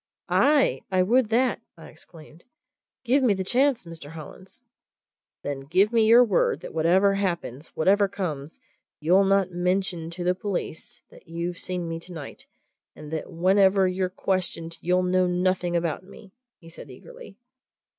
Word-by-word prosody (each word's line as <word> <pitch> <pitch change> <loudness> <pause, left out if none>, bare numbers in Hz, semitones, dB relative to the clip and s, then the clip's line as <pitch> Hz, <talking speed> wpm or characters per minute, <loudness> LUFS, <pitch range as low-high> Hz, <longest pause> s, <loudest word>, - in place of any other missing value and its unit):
"Aye! 290 -1 +3
I 185 -1 +3
would 235 +3 +2
that!" 250 +3 +1 0.2
I - - -13
exclaimed. 160 0 -16 0.6
"Give 260 +3 +2
me 235 -6 +3
the 190 - -3
chance, 255 +3 +1
Mr. 160 -3 -10
Hollins!" 165 - -12 0.8
"Then 145 -1 -4
give 185 +11 +1
me 225 -2 +4
your 235 +2 +7
word 210 -6 +1
that - - -9
whatever 180 +5 +3
happens, 170 -8 -3
whatever 200 +5 +3
comes, 160 -7 -5 0.4
you'll 180 +6 +3
not 195 -1 +2
mention 180 -1 -1
to 175 +1 -6
the 180 +1 +2
police 185 -4 -6
that - - -18
you've 170 +1 -4
seen 180 -2 -4
me 165 0 -4
tonight, 165 -4 -10 0.5
and 150 - -11
that 160 - -5
whenever 190 +2 +3
you're 185 0 -1
questioned 180 -3 -3
you'll 180 +1 +1
know 185 0 +2
nothing 180 0 0
about 170 +1 -1
me!" 195 +1 -15 0.2
he 165 - -18
said 165 - -12
eagerly. - - -13
185 Hz, 155 wpm, -25 LUFS, 165-200 Hz, 0.8 s, your